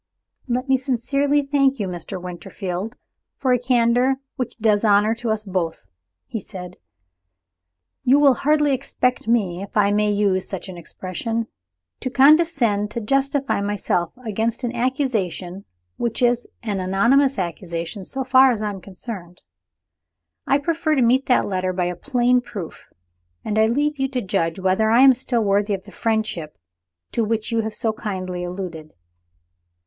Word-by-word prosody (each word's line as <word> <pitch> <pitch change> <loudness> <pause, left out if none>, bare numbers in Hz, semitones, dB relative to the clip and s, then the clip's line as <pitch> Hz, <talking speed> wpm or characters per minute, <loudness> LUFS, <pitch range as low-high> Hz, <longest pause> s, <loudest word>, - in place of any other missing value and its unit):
"Let 255 +2 -1
me 265 0 +4
sincerely 275 +3 +1
thank 275 -2 +2
you, 200 - -1
Mr. 180 +1 -6
Winterfield, 180 +4 -5 0.4
for 260 -2 +2
a 250 - +2
candor 245 +1 +3 0.2
which 250 - -4
does 215 -2 +2
honor 210 +1 +4
to 235 0 -4
us 220 -1 0
both," 180 -5 -3 0.4
he 225 - -4
said. 180 -3 -9 1.3
"You 265 +2 +5
will 280 -2 +6
hardly 295 +2 +2
expect 250 -2 -1
me 195 -7 +1
if 200 +2 -6
I 205 -1 +4
may 210 0 +2
use 200 -2 +1
such 190 -1 -5
an 185 - -7
expression 185 +7 -4 0.5
to - - -3
condescend 270 -7 +4
to 235 - -4
justify 275 +2 0
myself 200 -4 -1
against 225 +3 -2
an 240 0 -2
accusation 215 - -2 0.3
which 235 +1 -2
is 245 0 +2 0.2
an 205 -4 -2
anonymous 235 +9 +3
accusation 170 +1 -4
so 265 +8 -4
far 260 +1 +6
as 230 - -2
I 210 -1 -2
am 195 -2 -8
concerned. 185 -2 -9 1.1
I 275 - +4
prefer 315 +1 0
to 260 - +3
meet 255 +3 +3
that 250 - +3
letter 185 -1 -1
by 180 -1 0
a 180 0 -2
plain 250 +3 +2
proof; 200 -8 -8 0.6
and 215 0 0
I 220 - +5
leave 290 +5 0
you 270 - +1
to 260 -2 -3
judge 165 -3 -1
whether 190 +3 +2
I 235 +3 +5
am 270 -1 +8
still 245 -2 -1
worthy 200 0 +1
of 190 - -9
the 205 - -14
friendship 215 -10 -2 0.5
to 230 - 0
which 220 +1 -2
you 230 0 +2
have 220 -1 -5
so 225 -1 -1
kindly 185 -5 -4
alluded." 175 -4 -6
220 Hz, 160 wpm, -22 LUFS, 190-255 Hz, 1.3 s, am